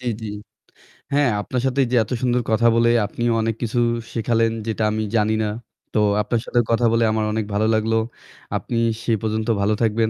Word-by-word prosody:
জ্বি, 125 - -3
জ্বি। 110 - -4 0.9
হ্যাঁ, 140 -4 +3
আপনার 125 +4 -3
সাথে 130 +1 0
এই - - -1
যে 125 - +2
এত - - -13
সুন্দর 125 -1 +1
কথা 115 +2 +3
বলে 115 0 +4 0.2
আপনিও 120 +3 -1
অনেক 115 0 -1
কিছু 120 +1 -1 0.3
শেখালেন 115 0 +1 0.2
যেটা 110 0 -1
আমি 110 0 -1
জানি 110 0 +2
না। - - 0 0.5
তো - - +2 0.2
আপনার 115 +1 -1
সাথে 120 - +1
কথা 115 +1 +2
বলে 115 0 +2
আমার 110 0 0
অনেক 110 -1 -1
ভালো 105 +2 +1
লাগলো। 110 +1 +1 0.6
আপনি 120 - -4 0.3
সেই 115 -2 +1
পর্যন্ত 110 0 -2
ভালো 105 +2 +2
থাকবেন। 110 0 +2
115 Hz, 195 wpm, -21 LUFS, 110-120 Hz, 0.9 s, বলে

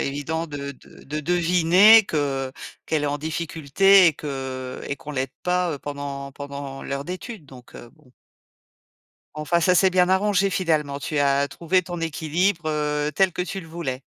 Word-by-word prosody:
évident 155 +4 -3
de 140 -2 -6
de - - -18
de 150 +2 -4
deviner 180 +6 +5
que 140 -5 -2 0.4
qu'elle 155 -2 0
est - - +1
en 145 +1 -2
difficulté 165 +4 +3
et 160 - +3
que 130 -3 -6
et 140 - -3
qu'on 150 - -10
l'aide 135 -2 -2
pas, 180 -1 0
heu, - - -8
pendant 140 -1 -6
pendant 140 -1 -7
l'heure 140 0 -4
d'études, 185 +1 -7
donc 130 -3 -15
heu, 120 - -11
bon. 150 -5 -25 1.3
Enfin, 170 +3 +1
ça 180 +2 +3
s'est 190 +2 +5
bien 180 -1 +3
arrangé 195 +1 +2
finalement. 155 -7 0
Tu 145 +1 -3
as 140 0 +2
trouvé 175 +5 0
ton 175 -1 -6
équilibre, 165 +2 -1
heu, 150 -1 -1
tel 190 0 +2
que 180 - -2
tu 190 +1 -4
le 165 - -12
voulais. 145 -6 -5
155 Hz, 175 wpm, -23 LUFS, 140-180 Hz, 1.3 s, deviner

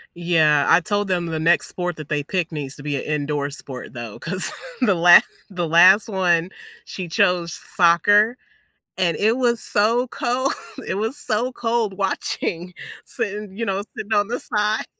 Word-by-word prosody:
Yeah, 160 -4 +2
I - - +5
told 205 +2 -1
them 175 -2 -1
the 160 -1 -3
next 165 +2 +2
sport 180 -1 -4
that 155 -2 -10
they 150 -1 0
picked 175 +2 -2
needs 145 -3 -5
to 140 - -12
be 145 -1 -2
a - - -3
indoor 145 -1 -2
sport 135 -3 -9
though, 120 -4 -8
'cause 185 +3 -1 0.3
the 210 -6 +4
la 175 0 +8 0.3
the 175 -4 -3
last 185 +7 +6
one, 180 -3 +1 0.3
she 185 -2 -7
chose 170 0 +1 0.2
soccer, 205 +6 +4 0.6
and 170 -3 +1
it 220 +2 +2
was 240 -3 +1
so 230 +5 +1
cold, 250 +3 -1 0.3
it - - -2
was 220 +7 -2
so 250 -3 -1
cold 230 -5 -2
watching, 180 -2 -3 0.3
sitting, 205 -1 -5
you 230 - -2
know, 195 -1 -2
sitting 215 +2 -4
on 205 0 +2
the 245 - -2
side. 210 +1 -1
185 Hz, 170 wpm, -21 LUFS, 165-210 Hz, 0.6 s, la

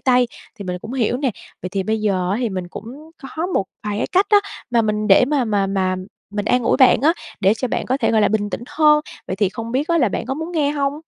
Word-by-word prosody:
tay 250 -1 +3 0.3
thì 200 - -6
mình 180 -1 -3
cũng 220 - -8
hiểu 245 -2 0
nè. 265 0 0 0.3
Vậy 180 - -3
thì 195 +1 -2
bây 220 +2 -1
giờ 185 -4 0
á, 200 - +1
thì 240 - 0
mình 185 -3 -5
cũng 270 - -10 0.3
có 325 +2 -1
một 360 - 0 0.2
vài 205 0 -2
cái - - 0
cách 380 +2 +4
á, 415 - +7 0.3
mà 235 -1 +3
mình 215 -1 -1
để 195 +5 +7
mà 280 -1 +1
mà 205 -3 +1
mà 190 -1 0 0.3
mình 205 0 -3
an 250 +2 +2
ủi - - +2
bạn 260 -2 +6
á, 310 +5 +4 0.3
để 195 +3 +4
cho 245 +2 -3
bạn - - -2
có 260 - +1
thể, 275 - +1
gọi 220 - +3
là, - - +4
bình 205 -1 -1
tĩnh 210 - -4
hơn. 300 -1 +4 0.3
Vậy 185 - -3
thì 200 0 +2
không 230 +4 -6
biết 275 +4 0
á, 335 0 +3
là 250 -7 +3
bạn 205 - -4
có 265 - -2
muốn 320 +4 -5
nghe 300 -4 +1
hông? 285 0 -1
230 Hz, 280 wpm, -20 LUFS, 205-280 Hz, 0.3 s, á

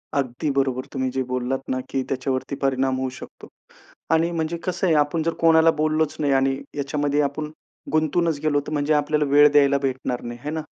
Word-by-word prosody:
अगदी 140 +2 -1
बरोबर. 135 -2 0
तुम्ही 130 0 -1
जे 130 +1 -1
बोललात 125 +1 -2
ना 130 - -1
की 135 - -1
त्याच्यावरती 130 +1 -2
परिणाम 135 -1 +1
होऊ 130 0 -1
शकतो 130 0 -12 0.7
आणि 165 +1 +2
म्हणजे 165 0 -2
कसं 185 +1 -2
आहे, 165 - +3
आपण 150 +2 +1
जर 165 +1 0
कोणाला 165 0 +5
बोललोच 155 0 +1
नाही 145 -2 +1
आणि 135 0 +2 0.2
याच्यामध्ये 145 +1 0
आपण 150 +2 -2 0.4
गुंतूनच 155 0 +1
गेलो, 150 -2 +2
तर 145 - -8
म्हणजे 145 +1 +1
आपल्याला 150 0 +1
वेळ 145 +1 +7
द्यायला 140 -1 +4
भेटणार 130 -2 -2
नाही, 120 0 -7
है 145 - -3
ना? 160 0 -3
145 Hz, 190 wpm, -23 LUFS, 135-155 Hz, 0.7 s, वेळ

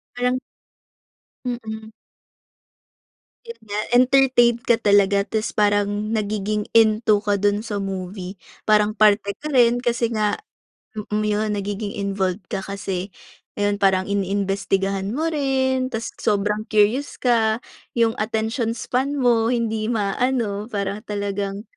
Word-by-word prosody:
Parang 250 +1 0 1.0
Mm. 220 -3 -5 1.5
Yun 465 0 -8
nga, 210 -1 -4 0.2
entertain 255 -2 +5
ka 235 - +3
talaga 200 -2 +3
ta's 220 0 -2
parang 205 -1 +3 0.2
nagiging 210 -1 -1
into 215 -1 +4
ka 205 -1 +1
dun 205 +1 +1
sa 205 -3 -3
movie. 190 0 -5 0.3
Parang 210 0 +4
parte 205 -1 +3
ka 305 - -5
rin 245 -3 +4
kasi 235 -1 0
nga, 210 -2 +1 0.6
mm, 210 0 -2
iyon, 210 0 0
nagiging 205 +1 -4
involved 195 -1 -2
ka - - -2
kasi, 195 -1 -4 0.4
ayon, 205 0 0
parang 190 0 +2
iniimbestigahan 195 0 -1
mo 320 +4 0
rin 265 -3 0
ta's 225 -3 -4
sobrang 210 +1 0
curious 220 +7 +2
ka. 230 -2 +1 0.3
Yung 230 -1 +1
attention 225 +2 -1
span 260 +4 -1
mo, 240 -5 +2
hindi 225 -3 0
maano. 220 -1 -1
Para 200 -2 -3
talagang 200 -1 -3
215 Hz, 120 wpm, -22 LUFS, 200-235 Hz, 1.5 s, entertain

